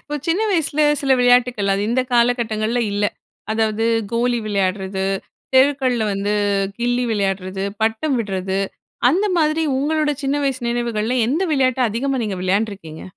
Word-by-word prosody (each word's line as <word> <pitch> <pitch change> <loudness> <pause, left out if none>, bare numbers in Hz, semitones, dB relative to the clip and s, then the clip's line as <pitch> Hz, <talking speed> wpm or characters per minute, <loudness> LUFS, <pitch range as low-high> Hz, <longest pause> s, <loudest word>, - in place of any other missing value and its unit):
இப்ப 295 - -5
சின்ன 335 +4 +1
வயசுல 310 -4 +1 0.2
சில 270 -2 +2
விளையாட்டுக்கள், 245 -4 +3
அது 195 - 0
இந்த 240 +3 +2
காலகட்டங்கள்ல 235 -1 +1
இல்ல. 205 +1 0 0.5
அதாவது 220 0 0 0.3
கோலி 240 +1 +1
விளையாடுறது, 190 -1 -1 0.5
தெருக்கள்ல 260 -4 +3
வந்து 200 +1 -1 0.5
கில்லி 245 +1 0
விளையாடுறது, 195 -2 -2 0.2
பட்டம் 225 +6 +1
விடுறது 190 -2 -2 0.5
அந்த 370 +9 +1
மாதிரி 310 0 +2 0.2
உங்களோட 300 +2 +1
சின்ன 275 +1 0
வயசு 270 -2 -1
நினைவுகள்ல 235 0 -1
எந்த 305 +9 0
விளையாட்ட 260 -2 +1
அதிகமா 265 +5 -1
நீங்க 205 -3 -3
விளையாண்டுருக்கீங்க? 190 -4 -2
235 Hz, 130 wpm, -20 LUFS, 205-265 Hz, 0.5 s, விளையாட்டுக்கள்